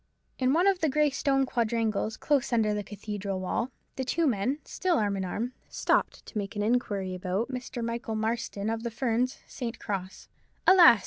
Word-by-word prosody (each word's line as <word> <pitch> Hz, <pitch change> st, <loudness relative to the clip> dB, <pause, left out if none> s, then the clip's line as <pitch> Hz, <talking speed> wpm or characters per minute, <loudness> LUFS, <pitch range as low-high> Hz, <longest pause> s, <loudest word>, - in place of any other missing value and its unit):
In 255 Hz, 0 st, +3 dB
one 340 Hz, +4 st, +4 dB
of 390 Hz, -2 st, +4 dB
the 320 Hz, -, +2 dB
grey 300 Hz, +1 st, +3 dB
stone 270 Hz, 0 st, +2 dB
quadrangles 225 Hz, -3 st, 0 dB
close 280 Hz, -5 st, +1 dB
under 220 Hz, -3 st, +3 dB
the 210 Hz, -, -1 dB
cathedral 205 Hz, -1 st, -4 dB
wall, 205 Hz, +6 st, -1 dB, 0.3 s
the 265 Hz, -, 0 dB
two 330 Hz, +6 st, +1 dB
men, 255 Hz, +1 st, +1 dB
still 365 Hz, -3 st, +1 dB
arm 205 Hz, -4 st, +1 dB
in 190 Hz, -, -2 dB
arm, 225 Hz, +7 st, -3 dB, 0.2 s
stopped -, -, +1 dB
to 215 Hz, -, -4 dB
make 200 Hz, +1 st, -5 dB
an 205 Hz, -, 0 dB
inquiry 205 Hz, -5 st, 0 dB
about 185 Hz, +6 st, -1 dB
Mr. 245 Hz, -2 st, -4 dB
Michael 230 Hz, -1 st, -3 dB
Marston, 220 Hz, -2 st, -2 dB
of 225 Hz, 0 st, -2 dB
the 235 Hz, -, -2 dB
Ferns, 245 Hz, +2 st, 0 dB
St. 245 Hz, -3 st, -5 dB
Cross. 190 Hz, -3 st, -5 dB, 0.4 s
Alas! 345 Hz, -, +9 dB
230 Hz, 185 wpm, -29 LUFS, 205-260 Hz, 0.4 s, Alas